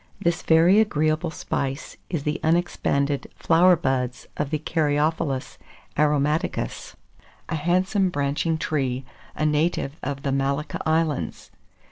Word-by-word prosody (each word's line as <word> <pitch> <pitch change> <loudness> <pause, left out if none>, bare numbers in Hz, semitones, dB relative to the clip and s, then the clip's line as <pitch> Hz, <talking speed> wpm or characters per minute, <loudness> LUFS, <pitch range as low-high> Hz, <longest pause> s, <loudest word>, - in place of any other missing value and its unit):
This 170 0 0
very 170 +5 +5
agreeable 155 -5 +1
spice 140 -2 -4
is 165 -6 -2
the 150 +3 -1
unexpanded 155 -4 +1
flower 175 +2 +5
buds 130 -5 -2
of 145 -2 -2
the 155 - 0
Caryophyllus 150 -2 -1 0.4
aromaticus, 150 +1 0 0.5
a 170 - -1
handsome, 185 +5 +1
branching 145 +1 0
tree, 135 -5 -1 0.3
a 155 - -1
native 150 -1 0
of 140 0 -4
the 140 - 0
Malacca 140 +2 -1
Islands. 160 -3 -1
150 Hz, 115 wpm, -24 LUFS, 140-165 Hz, 0.5 s, very